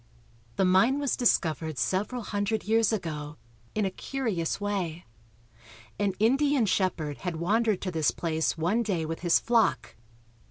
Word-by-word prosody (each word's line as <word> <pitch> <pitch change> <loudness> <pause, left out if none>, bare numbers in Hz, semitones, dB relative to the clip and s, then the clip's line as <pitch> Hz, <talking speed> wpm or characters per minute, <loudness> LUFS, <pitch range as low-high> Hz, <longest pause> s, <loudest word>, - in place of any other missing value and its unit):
The 190 - +2
mine 190 +9 +4
was 285 -2 0
discovered 160 - +1
several 195 - -1
hundred 205 +2 -2
years 225 +1 +2
ago, 150 -7 -4 0.4
in 215 -1 +1
a 190 - -1
curious 215 -8 -3
way. 190 -5 -3 0.9
An 200 -2 +1
Indian 270 +3 +3
shepherd 175 -7 -1
had 180 -3 -3
wandered 210 +5 +1
to 185 - -3
this 160 -3 +1
place 160 -1 -1
one 180 +9 +1
day 190 -8 -1
with 165 +1 -4
his 175 -1 +3
flock. 230 -3 +1
195 Hz, 145 wpm, -28 LUFS, 165-225 Hz, 0.9 s, mine